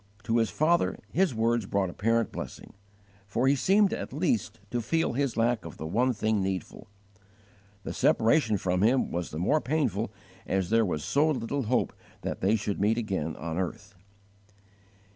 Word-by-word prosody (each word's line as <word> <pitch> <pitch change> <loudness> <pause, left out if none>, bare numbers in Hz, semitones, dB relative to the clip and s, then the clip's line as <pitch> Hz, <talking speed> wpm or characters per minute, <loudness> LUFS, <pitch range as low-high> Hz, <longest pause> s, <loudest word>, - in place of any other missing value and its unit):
To 115 +1 +1
his 115 -1 +2
father 155 - +2
his 180 -7 +2
words 115 -1 +1
brought 100 -3 0
apparent 115 +3 +1
blessing, - - -8 0.5
for 120 +6 +1
he 140 - +5
seemed 195 +8 +3
at - - -4
least 120 - -1
to 120 - 0
feel 160 +5 0
his 140 0 -1
lack 115 0 +1
of 85 -3 -9
the 80 - -6
one 120 +10 +2
thing 110 -2 0
needful. 95 -2 -4 1.0
The - - -5
separation 115 -1 +3
from 90 -1 0
him 125 +5 +3
was 85 0 -3
the 75 - -7
more 145 - +2
painful 120 - -1 0.4
as 95 0 0
there 115 0 +4
was 75 -4 -2
so 150 +3 +2
little 140 -1 -2
hope 125 +4 +1 0.3
that - - -4
they 100 +4 +3
should 105 -2 -2
meet 110 +3 +3
again 95 -9 -2
on 80 +2 -4
earth. 100 +3 -4
115 Hz, 170 wpm, -28 LUFS, 95-130 Hz, 1.0 s, he